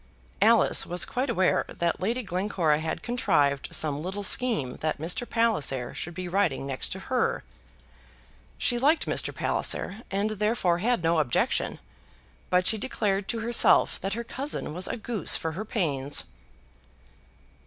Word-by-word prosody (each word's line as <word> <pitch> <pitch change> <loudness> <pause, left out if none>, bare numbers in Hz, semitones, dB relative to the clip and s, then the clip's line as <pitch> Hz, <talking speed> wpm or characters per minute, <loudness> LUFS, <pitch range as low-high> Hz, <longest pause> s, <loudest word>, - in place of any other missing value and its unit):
Alice - - +5
was 175 +1 +1
quite 255 +2 -2
aware 190 -5 +2
that 170 -1 -1
Lady 235 +6 -1
Glencora 180 -5 0
had 160 0 -4
contrived 150 - +1
some 150 -2 0
little 190 +4 -4
scheme 210 - +2
that 155 0 -2
Mr. 170 +10 -1
Palliser 155 - +1
should 175 0 -5
be 185 0 -5
riding 175 -7 0
next 135 -1 -2
to 190 - -4
her. 465 - -1 1.1
She 240 -1 +1
liked 300 +6 +3
Mr. - - 0
Palliser, 195 +5 -1
and 200 +2 -1
therefore 210 -4 0
had 235 -1 0
no 165 0 +2
objection; 130 -7 0 0.7
but 180 0 +2
she 220 +2 +3
declared 200 -4 -1
to 230 -1 -2
herself 235 +1 +3
that 195 0 -2
her 235 +2 -3
cousin 265 - -4
was 180 +2 +1
a - - -3
goose 220 -4 0
for 160 - -3
her 190 +7 -5
pains. 145 - -1
190 Hz, 150 wpm, -27 LUFS, 160-230 Hz, 1.1 s, Alice